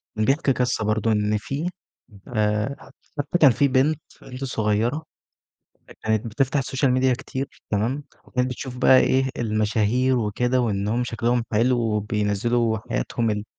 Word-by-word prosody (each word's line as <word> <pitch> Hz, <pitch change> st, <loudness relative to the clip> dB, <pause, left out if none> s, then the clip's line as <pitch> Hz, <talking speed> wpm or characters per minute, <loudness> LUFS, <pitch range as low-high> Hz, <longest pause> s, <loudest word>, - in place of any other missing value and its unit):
كان 110 Hz, 0 st, 0 dB
بيحكي 135 Hz, 0 st, +2 dB
قصة 125 Hz, -3 st, 0 dB
برضه 110 Hz, +1 st, +1 dB
إن 105 Hz, 0 st, +1 dB
في 145 Hz, +10 st, -3 dB, 0.6 s
آآ 105 Hz, +3 st, 0 dB
ح -, -, -15 dB, 0.4 s
حتي 145 Hz, +4 st, 0 dB
كان 140 Hz, -5 st, +7 dB
في 140 Hz, +5 st, +2 dB
بنت 140 Hz, +4 st, +2 dB, 0.2 s
بنت 130 Hz, +1 st, -8 dB
صغيّرة 115 Hz, +5 st, 0 dB, 1.0 s
كانت 110 Hz, 0 st, 0 dB
بتفتح 135 Hz, +5 st, 0 dB
الsocial 135 Hz, +1 st, 0 dB
media 130 Hz, 0 st, +3 dB
كتير 130 Hz, +2 st, -5 dB
تمام، 120 Hz, +8 st, -1 dB, 0.2 s
وكانت 125 Hz, 0 st, -1 dB
بتشوف 125 Hz, 0 st, -6 dB
بقى 130 Hz, 0 st, +6 dB
إيه، 130 Hz, 0 st, +2 dB
المشاهير 110 Hz, +3 st, +1 dB
وكده 125 Hz, +4 st, 0 dB
وإنهم 110 Hz, +2 st, 0 dB
شكلهم 120 Hz, +1 st, 0 dB
حلو 120 Hz, +3 st, +3 dB
وبينزّلوا 110 Hz, +1 st, 0 dB
حياتهم 110 Hz, -, -2 dB
ال 105 Hz, 0 st, -2 dB
120 Hz, 140 wpm, -23 LUFS, 105-130 Hz, 1.0 s, كان